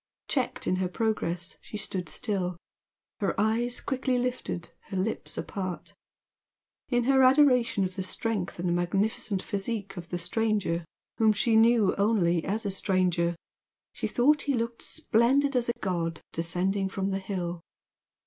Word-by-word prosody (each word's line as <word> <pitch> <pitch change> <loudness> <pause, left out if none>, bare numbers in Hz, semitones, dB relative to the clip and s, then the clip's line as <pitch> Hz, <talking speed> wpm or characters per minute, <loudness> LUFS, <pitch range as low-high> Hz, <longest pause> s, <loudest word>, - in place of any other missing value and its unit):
Checked 260 -4 -1
in 185 - +1
her 185 0 0
progress 180 -4 -2
she 210 - -7
stood 185 -4 -4
still, 185 -6 -1 0.6
her 200 -2 -1
eyes 230 +3 +1
quickly 260 -1 -1
lifted, 245 -8 -3 0.2
her 190 - -5
lips 195 +4 -2
apart. 185 -3 -4 1.0
In 245 -2 +2
her 265 +2 +4
adoration 255 -5 +5
of 185 0 -3
the 190 - -2
strength 205 0 -2
and 175 0 0
magnificent 195 +2 0
physique 200 0 -3
of 170 -1 -7
the 175 - -2
stranger 180 -2 0 0.3
whom 220 -1 +5
she 225 +2 +2
knew 225 -2 +5
only 180 -6 +3
as 215 +3 -2
a 200 - 0
stranger, 180 -3 +1 0.6
she - - -2
thought 290 +5 +3
he 280 -2 0
looked 230 0 -2
splendid 265 +5 +2
as 240 -1 +1
a 235 - -2
god 170 -4 -2
descending 185 +4 0
from 195 0 -2
the 195 - -1
hill. 180 -3 -4
200 Hz, 150 wpm, -28 LUFS, 180-235 Hz, 1.0 s, adoration